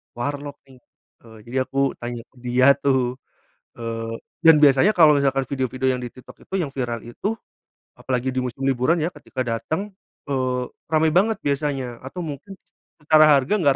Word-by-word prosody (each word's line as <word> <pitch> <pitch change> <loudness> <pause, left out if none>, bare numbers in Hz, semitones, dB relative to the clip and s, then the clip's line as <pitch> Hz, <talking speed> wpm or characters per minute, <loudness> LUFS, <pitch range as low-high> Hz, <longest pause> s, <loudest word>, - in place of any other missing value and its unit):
warlok 145 +3 -4 0.2
nih. 130 - -17 0.5
Eee, 110 -1 -14
jadi 125 +3 -5
aku 135 0 +1
tanya 120 -1 -5
ke - - -33
dia 125 +2 +4
tuh, 130 -2 0 0.6
eee, 115 -1 -4 0.2
dan 165 -2 +7
biasanya 150 +7 +5
kalau 155 -3 +7
misalkan 135 -1 +1
video-video 130 0 -1
yang 125 - -3
di 125 - -5
TikTok 130 +1 -16
itu - - -7
yang 145 -5 -3
viral 120 -4 -4
itu, 200 - -4 0.6
apalagi 130 -1 -3
di - - +1
musim 125 +1 -6
liburan 135 +6 +2
ya - - +1
ketika 130 - -11
dateng, 160 - -3 0.4
eee, 130 -1 0 0.3
rame 160 0 +3
banget 215 +3 +3
biasanya, 135 -4 -2
atau 135 +7 -8
mungkin 160 +6 -7 0.5
secara 155 0 +6 0.2
harga 135 +9 -2
gak 140 -2 +4
135 Hz, 165 wpm, -22 LUFS, 125-150 Hz, 0.6 s, dan